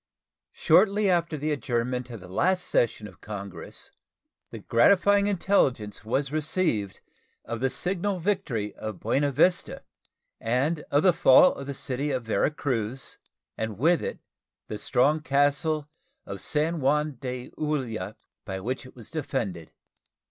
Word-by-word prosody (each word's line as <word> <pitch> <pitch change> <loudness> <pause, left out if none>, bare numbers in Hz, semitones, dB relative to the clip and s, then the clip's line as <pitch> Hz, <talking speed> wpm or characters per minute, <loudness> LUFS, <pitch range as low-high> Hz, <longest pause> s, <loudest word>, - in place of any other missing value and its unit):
Shortly 205 -1 +4
after 170 -3 0
the 150 +2 -2
adjournment 125 -1 -2
of 115 -5 -8
the 90 - -11
last 180 - +1
session 110 -2 0
of 95 - -16
Congress 100 -4 -8 0.6
the - - -8
gratifying 200 +10 +4
intelligence 135 - +1
was 135 +5 -1
received 155 - -1 0.4
of 115 0 -4
the 130 +2 +1
signal 190 +5 -1
victory 165 - -1
of 110 -4 -6
Buena 140 +6 +1
Vista, 175 +6 +1 0.6
and 135 +8 0
of 145 - +3
the 185 - +6
fall 160 +3 +6
of 140 - -8
the 140 - -4
city 135 +2 -2
of 130 -3 -1
Vera 110 +1 +1
Cruz, 130 -4 -3 0.4
and 110 -3 -4
with 165 +8 +3
it - - -4 0.5
the 105 - -4
strong 140 +5 +2
castle 145 +2 +1 0.4
of 100 -2 -7
San 160 +2 0
Juan 150 0 +1
de 125 -2 -5
Ulloa, 120 -10 -3 0.3
by 95 -2 -5
which 125 +6 -4
it - - -17
was 115 -4 -12
defended. 110 - -3
135 Hz, 140 wpm, -26 LUFS, 115-155 Hz, 0.6 s, the